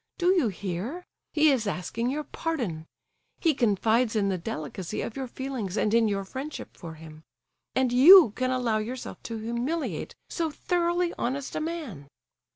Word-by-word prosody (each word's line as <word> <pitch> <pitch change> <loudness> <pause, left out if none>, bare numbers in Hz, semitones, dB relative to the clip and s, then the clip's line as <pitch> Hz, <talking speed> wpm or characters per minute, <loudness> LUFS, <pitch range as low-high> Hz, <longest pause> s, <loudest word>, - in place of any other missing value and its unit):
Do 355 0 +2
you 350 -10 +3
hear? 205 - -4 0.3
He 310 -1 +5
is 235 -6 0
asking 210 +6 -2
your 300 +3 -2
pardon. 235 - -3 0.5
He 325 -3 +3
confides 225 0 +2
in 200 -2 +2
the 190 - 0
delicacy 165 +2 -5
of 230 - -5
your 265 -1 -4
feelings, 245 -7 -4
and 210 - +1
in 230 -1 +4
your 200 -1 -1
friendship 270 +9 -7
for 165 -2 -9
him. 155 -1 -12 0.5
And 260 -2 +2
you 315 - +9
can 255 +4 -1
allow 245 -4 +1
yourself 245 +4 -6
to 230 - -5
humiliate 235 +9 -3
so 330 -2 -2
thoroughly 345 +2 0
honest 265 +2 -2
a - - -1
man!" 305 - -5
245 Hz, 160 wpm, -27 LUFS, 205-300 Hz, 0.5 s, you